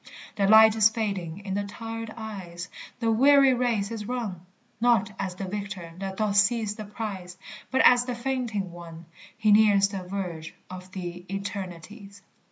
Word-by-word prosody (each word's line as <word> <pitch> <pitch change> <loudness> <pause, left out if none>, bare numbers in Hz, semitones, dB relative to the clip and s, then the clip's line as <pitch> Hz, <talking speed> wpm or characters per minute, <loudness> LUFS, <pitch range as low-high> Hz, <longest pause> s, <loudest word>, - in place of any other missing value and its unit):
The 200 -1 +2
light 220 +1 +8
is 220 -1 +6
fading 200 -5 -4
in 190 - -3
the 205 +1 -1
tired 225 +2 -6
eyes, 185 -5 -7 0.3
The 230 -1 +1
weary 275 +3 +6
race 235 -4 0
is 215 -2 -5
run; 220 -9 -4 0.4
Not 225 -4 +3
as 190 -2 -3
the 195 - -5
victor 190 -3 -6
that 195 -1 -5
doth 210 -2 0
seize 215 +1 +3
the 215 -1 -7
prize. 200 -4 -6 0.3
But 265 - +2
as 245 0 +6
the 250 -1 -3
fainting 235 -7 -2
one, 170 -1 -10 0.3
He 215 -1 +3
nears 205 -2 +5
the 195 -2 -5
verge 180 -4 -5 0.2
of 185 0 -9
the 175 -1 -6
eternities. 195 +1 -7
205 Hz, 165 wpm, -26 LUFS, 185-225 Hz, 0.4 s, light